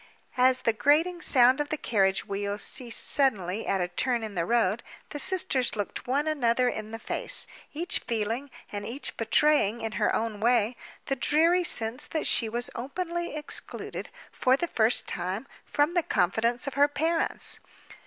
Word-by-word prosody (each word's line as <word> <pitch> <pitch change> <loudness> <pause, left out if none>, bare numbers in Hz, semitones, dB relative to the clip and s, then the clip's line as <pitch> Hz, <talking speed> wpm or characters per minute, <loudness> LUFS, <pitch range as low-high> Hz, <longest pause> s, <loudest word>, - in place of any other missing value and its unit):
As 255 0 +4
the 230 - +2
grating 325 +9 +2
sound 255 -1 +4
of 290 - -4
the 310 - -1
carriage 195 -7 +1
wheels 200 +1 -2
ceased 245 -4 0
suddenly 215 - +1
at 195 - +1
a 175 - 0
turn 235 +6 -1
in 215 -2 -5
the 170 -2 -2
road, 230 -2 +2 0.3
the 290 - -5
sisters 275 -8 +1
looked 205 +4 -4
one 280 +4 0
another 250 -5 +2
in 215 -2 -5
the 225 - -6
face; - - -3 0.3
each 345 +6 0
feeling, 230 +4 -3 0.2
and 205 0 -5
each 255 +7 -4
betraying 235 -1 +2
in 225 0 -3
her - - +3
own 220 -2 -2
way, 235 +1 +2 0.3
the 270 - -1
dreary 330 +7 +3
sense 245 -2 +1
that 315 - -2
she 225 - +2
was 240 +2 -3
openly 340 +6 -4
excluded, 300 -1 -5 0.2
for 260 +1 +2
the 345 - -2
first 225 -5 +2
time, 185 +7 -3 0.2
from 295 +3 +1
the 350 - +3
confidence 230 - +1
of 275 - -4
her 285 +1 +4
parents. 320 +3 0
245 Hz, 170 wpm, -27 LUFS, 220-295 Hz, 0.3 s, As